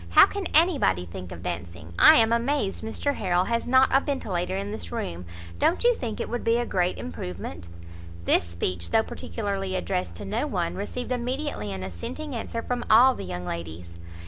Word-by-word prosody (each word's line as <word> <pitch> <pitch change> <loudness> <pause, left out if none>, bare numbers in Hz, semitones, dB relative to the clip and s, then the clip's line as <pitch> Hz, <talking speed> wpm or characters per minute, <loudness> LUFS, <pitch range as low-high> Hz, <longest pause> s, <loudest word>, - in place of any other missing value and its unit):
How 85 - +8
can 400 -3 -4
anybody 290 - +3
think 90 +1 -9
of 85 0 -9
dancing! 85 -2 -6
I - - +9
am 225 0 +5
amazed 235 -4 0
Mr 255 +6 -1
Harrel 180 -7 +1
has 230 +3 -1
not 260 +1 +5
a 270 - +5
ventilator 190 - -2
in 200 +1 -4
this 215 - -6
room. 90 - -4 0.3
Don't 345 - +2
you 485 0 +5
think 235 - -5
it - - -2
would 240 0 -3
be 230 +1 +3
a 240 - 0
great 180 -4 0
improvement?" 85 +1 -6 0.6
This - - +4
speech, 85 0 -2
though 220 - +3
particularly 195 -5 -4
addressed 90 - -2
to - - -7
no - - -1
one, 85 - -1
received 245 - -4
immediately 250 - -2
an 95 -1 -5
assenting 95 - -6
answer 230 0 -4
from 245 -1 -2
all 245 +4 +7
the - - -7
young 90 0 -5
ladies. 85 0 -6
195 Hz, 190 wpm, -26 LUFS, -, 0.6 s, I